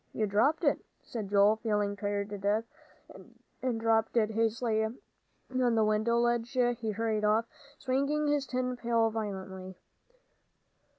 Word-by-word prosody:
You 215 Hz, -, 0 dB
dropped 240 Hz, -, +2 dB
it," 285 Hz, -, +2 dB, 0.2 s
said 220 Hz, -4 st, -5 dB
Joel, 205 Hz, +2 st, +5 dB
feeling 210 Hz, -2 st, 0 dB
tired 205 Hz, 0 st, -2 dB
to 205 Hz, -1 st, -6 dB
death. 205 Hz, +3 st, +1 dB, 1.0 s
And 250 Hz, -3 st, -1 dB
dropping 225 Hz, +1 st, +2 dB
it 215 Hz, -, -2 dB
hastily 225 Hz, 0 st, +1 dB
on 245 Hz, +1 st, -4 dB
the 220 Hz, -1 st, +3 dB
window 215 Hz, +2 st, +2 dB
ledge 240 Hz, 0 st, +1 dB
he 240 Hz, -3 st, +1 dB
hurried 215 Hz, 0 st, -1 dB
off, 215 Hz, +2 st, +3 dB, 0.3 s
swinging 280 Hz, +3 st, 0 dB
his 290 Hz, -2 st, +1 dB
tin 255 Hz, 0 st, -1 dB
pail 230 Hz, -2 st, +1 dB
violently. 190 Hz, -3 st, -5 dB
225 Hz, 135 wpm, -30 LUFS, 210-245 Hz, 1.0 s, Joel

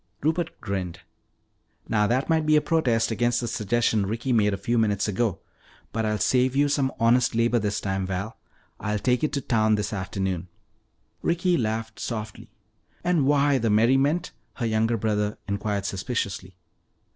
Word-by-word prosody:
Rupert 165 Hz, +3 st, -1 dB
grinned. 95 Hz, -3 st, -4 dB, 0.9 s
"Now 105 Hz, -2 st, +2 dB
that 130 Hz, +4 st, 0 dB
might 160 Hz, -2 st, +1 dB
be 155 Hz, -, +5 dB
a -, -, +7 dB
protest 125 Hz, -9 st, +1 dB
against 120 Hz, +2 st, +1 dB
the 120 Hz, -, -3 dB
suggestion 110 Hz, -1 st, +1 dB
Ricky 115 Hz, +5 st, -1 dB
made 105 Hz, -3 st, +3 dB
a 100 Hz, -, -2 dB
few 115 Hz, +4 st, 0 dB
minutes 105 Hz, -2 st, +1 dB
ago. 105 Hz, 0 st, 0 dB, 0.5 s
But 110 Hz, -1 st, -1 dB
I'll 105 Hz, 0 st, 0 dB
save 130 Hz, +3 st, +2 dB
you 145 Hz, +1 st, +3 dB
some 140 Hz, -2 st, +1 dB
honest 115 Hz, +1 st, +3 dB
labor 115 Hz, +1 st, +2 dB
this 105 Hz, -1 st, -1 dB
time, 95 Hz, -1 st, -2 dB
Val; 100 Hz, +4 st, -4 dB, 0.4 s
I'll 105 Hz, +1 st, -1 dB
take 125 Hz, +6 st, +1 dB
it 155 Hz, -, +1 dB
to 140 Hz, -, -1 dB
town 110 Hz, -3 st, +2 dB
this 105 Hz, 0 st, -2 dB
afternoon." 95 Hz, -2 st, -3 dB, 0.7 s
Ricky 175 Hz, +1 st, +1 dB
laughed 110 Hz, -3 st, -2 dB
softly. 110 Hz, 0 st, -5 dB, 0.5 s
"And 175 Hz, -6 st, +2 dB
why 145 Hz, -1 st, +3 dB
the 115 Hz, -1 st, 0 dB
merriment?" 135 Hz, +10 st, +3 dB, 0.2 s
her 120 Hz, -, -3 dB
younger 115 Hz, +1 st, +1 dB
brother 105 Hz, -1 st, -1 dB
inquired 100 Hz, 0 st, -2 dB
suspiciously. 95 Hz, -3 st, -3 dB
115 Hz, 160 wpm, -25 LUFS, 105-130 Hz, 0.9 s, a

